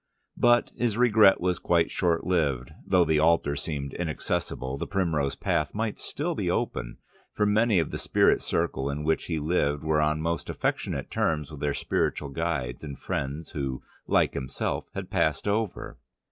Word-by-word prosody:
But 120 0 +4
his 115 -3 0
regret 110 -5 +6
was 90 0 0
quite 85 -1 +2
short 85 -3 +1
lived; 70 -9 0 0.2
though 90 -2 +4
the 80 -1 +2
altar 80 -2 +3
seemed 70 -2 -4
inaccessible, 75 -5 -3
the - - -3
primrose 80 -8 0
path 75 +3 -1
might 110 0 -2
still - - -3
be - - -2
open, - - -2 0.4
for 105 - +1
many 105 0 +3
of 80 -4 +1
the - - -4
spiritualistic - - +2
circle 65 +1 0
in 70 +1 -3
which 80 +1 +1
he 80 - -2
lived 75 -2 0
were 80 -1 +2
on 75 0 +1
most 85 +1 -2
affectionate - - -2
terms 75 -2 0
with 75 - -8
their 70 0 -1
spiritual 70 - -1
guides 70 -5 -2
and 70 -3 -6
friends 70 +4 -4
who, 65 -3 -3 0.2
like - - +3
himself, 65 -1 -2
had - - -5
passed - - +1
over. 105 0 -2
80 Hz, 170 wpm, -27 LUFS, 70-90 Hz, 0.4 s, regret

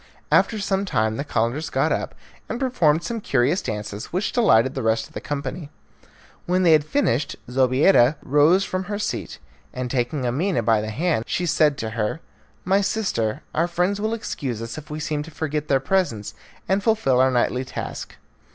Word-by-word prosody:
After 220 - +3
some 195 -1 0
time 110 - 0
the 140 - -2
Calenders 135 +3 -1
got - - +1
up - - -2 0.3
and 240 - -3
performed 170 - +2
some 230 -2 -4
curious 145 +2 +1
dances, 105 -1 -5
which 185 +4 -2
delighted 130 - +4
the 135 - -3
rest 110 -1 +1
of - - -18
the - - -6
company. 145 +2 -5 0.8
When 180 +1 +2
they 170 - +5
had 155 -2 +5
finished 145 - 0
Zobeida 130 +3 +4
rose 155 +8 +4
from 185 0 -3
her 205 +1 -3
seat, 210 - -4 0.3
and, 125 -1 -4
taking 125 +1 -1
Amina 140 +3 0
by 110 -1 +3
the 110 - -4
hand, 145 0 0
she 180 - -1
said 150 -3 +3
to 110 0 -4
her, 110 +7 -2 0.5
"My 195 +2 +3
sister, 155 - -1
our 165 +2 +1
friends 180 +4 0
will 220 +1 0
excuse 130 - -4
us 115 0 -6
if 155 0 -9
we 150 +1 -5
seem 150 -1 -2
to 155 - -8
forget 150 -1 -3
their 135 -2 +3
presence 135 - -1 0.3
and 195 +1 +1
fulfil 200 - +2
our 130 +1 +5
nightly 125 0 +1
task." 130 - -6
150 Hz, 185 wpm, -23 LUFS, 120-185 Hz, 0.8 s, they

